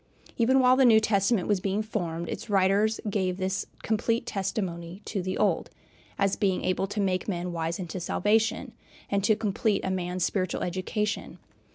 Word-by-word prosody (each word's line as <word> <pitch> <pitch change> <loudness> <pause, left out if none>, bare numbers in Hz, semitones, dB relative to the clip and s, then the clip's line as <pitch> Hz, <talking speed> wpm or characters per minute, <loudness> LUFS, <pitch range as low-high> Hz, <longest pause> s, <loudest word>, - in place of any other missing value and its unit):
Even 255 +3 +3
while 255 0 +6
the 265 - +4
New 225 -3 +7
Testament 205 -2 +1
was 205 -2 +2
being 195 +3 -1
formed, 175 -6 -3
its 230 - -6
writers 200 +2 +3
gave 190 -3 0
this 190 0 -2 0.2
complete 225 +1 0
testimony 190 -2 -4
to 200 - -2
the 185 +1 -3
Old, - - +1 0.5
as 195 -1 +2
being 195 -3 0
able 185 +1 0
to 205 - -4
make 185 -2 0
men 180 -3 -2
"wise 165 0 -2
unto 185 0 -5
salvation," 225 +7 +1 0.4
and 200 -1 +1
to 215 +2 +4
complete 210 -1 0
a 190 - 0
man's 180 -1 -1
spiritual 185 -2 -1
education. 190 +4 -2
195 Hz, 170 wpm, -27 LUFS, 185-215 Hz, 0.5 s, New